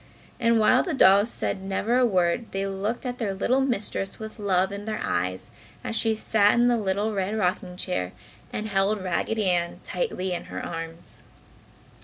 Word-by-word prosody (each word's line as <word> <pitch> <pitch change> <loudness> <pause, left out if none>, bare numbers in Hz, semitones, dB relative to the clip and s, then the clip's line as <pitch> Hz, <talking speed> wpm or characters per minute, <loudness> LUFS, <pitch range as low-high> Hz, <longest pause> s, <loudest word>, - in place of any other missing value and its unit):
And 230 -1 +3
while 215 - +5
the 345 -5 -2
dolls 200 -2 +6
said 195 - -3
never 195 +5 -1
a 255 - +5
word 185 +2 +1
they 195 0 -1
looked 200 +6 -3
at 250 0 -4
their 205 -5 -1
little 255 +7 +2
mistress 210 -6 -2
with 220 +1 -8
love 190 -2 +1
in 200 +1 -6
their 215 -1 -3
eyes 90 +1 -2 0.3
as 225 - -3
she 225 0 +2
sat 210 -1 +3
in 240 0 +4
the 240 -1 +3
little 205 +1 0
red 200 +2 -1
rocking 180 -2 -1
chair 90 - -2 0.4
and 215 - -3
held 200 +1 +1
Raggedy 205 +3 0
Ann 170 -1 -1
tightly 190 - -2
in 175 - -4
her - - -6
arms. 165 0 -7
200 Hz, 180 wpm, -26 LUFS, 185-225 Hz, 0.4 s, dolls